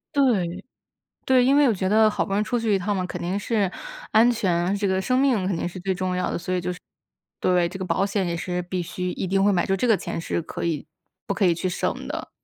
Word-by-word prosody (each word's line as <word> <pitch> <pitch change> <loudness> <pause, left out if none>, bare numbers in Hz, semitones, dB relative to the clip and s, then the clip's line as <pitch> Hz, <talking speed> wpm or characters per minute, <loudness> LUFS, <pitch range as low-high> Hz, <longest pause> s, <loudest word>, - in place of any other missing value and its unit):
对。 215 -12 +1 0.6
对。 255 -1 +4
因 275 +2 +4
为 290 - +6
我 - - +3
觉 190 0 -1
得 215 +2 +5
好 210 - -1
不 195 - -6
容 200 - +2
易 - - +2
出 240 +2 -1
去 220 -3 +1
一 - - +2
趟 200 +2 -1
嘛 185 - -1
肯 - - -6
定 180 +3 -1
是 205 -3 0 0.4
安 230 +3 +6
全， 175 -6 0
呃 195 - +1
这 200 0 -1
个 190 0 +1
生 255 +7 +1
命 250 -9 +2
肯 190 -3 0
定 175 - -2
是 180 - -9
最 190 +1 -1
重 185 0 -2
要 180 - -1
的， - - -2
所 180 +2 -3
以 180 - 0
就 180 +1 -2
是 180 - -9 0.6
对， 180 -2 +2
这 190 - -8
个 185 - -3
保 190 - +1
险 195 -1 -1
也 170 -1 -2
是 180 +1 -3
必 180 0 -3
须 180 +2 -4
一 - - -3
定 195 +1 +1
会 205 - +4
买， 175 -3 +2
就 195 - +1
这 245 - 0
个 220 - +5
钱 165 - -4
是 165 - -2
可 - - -6
以 160 -3 -2 0.4
不 200 - -1
可 200 - +1
以 170 - +4
去 185 +3 -2
省 180 - -2
的。 - - -5
190 Hz, 305 characters per minute, -24 LUFS, 180-210 Hz, 0.6 s, 为